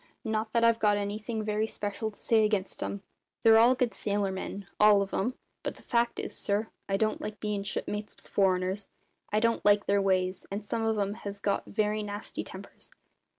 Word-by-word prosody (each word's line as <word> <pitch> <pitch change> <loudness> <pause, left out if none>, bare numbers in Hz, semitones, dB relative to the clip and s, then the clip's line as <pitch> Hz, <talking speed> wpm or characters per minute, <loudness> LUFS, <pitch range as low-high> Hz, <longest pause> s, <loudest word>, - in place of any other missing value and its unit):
Not 220 -1 -1
that 235 - +3
I've 230 0 +5
got 210 -2 +3
anything 215 +2 -3
very 215 +1 0
special 210 +1 -3
to 210 - -16
say 225 -2 +3
against 210 -3 0
'em. 200 0 -4 0.4
They're 225 +3 +7
good 250 -2 0
sailor 200 -1 -1
men, 195 +1 -5
all 210 -1 +7
of 195 - -9
'em; 245 +6 0 0.3
but - - -4
the - - -16
fact 235 0 +1
is, - - -5
sir, 205 +2 -1 0.2
I 195 - +2
don't 215 +1 0
like 215 0 -5
bein' 210 -1 -1
shipmates 210 +1 -4
with - - -18
foreigners; 190 0 +1 0.4
I 210 - +3
don't 230 +1 +1
like 205 0 +5
their 200 0 +3
ways, 185 -1 +1
and 200 +1 -4
some 225 +2 -2
of 220 -1 +1
'em 200 0 0
has 200 0 -5
got 200 0 -1
very 210 +1 0
nasty 205 0 -5
tempers. - - -11
210 Hz, 195 wpm, -29 LUFS, 200-220 Hz, 0.4 s, They're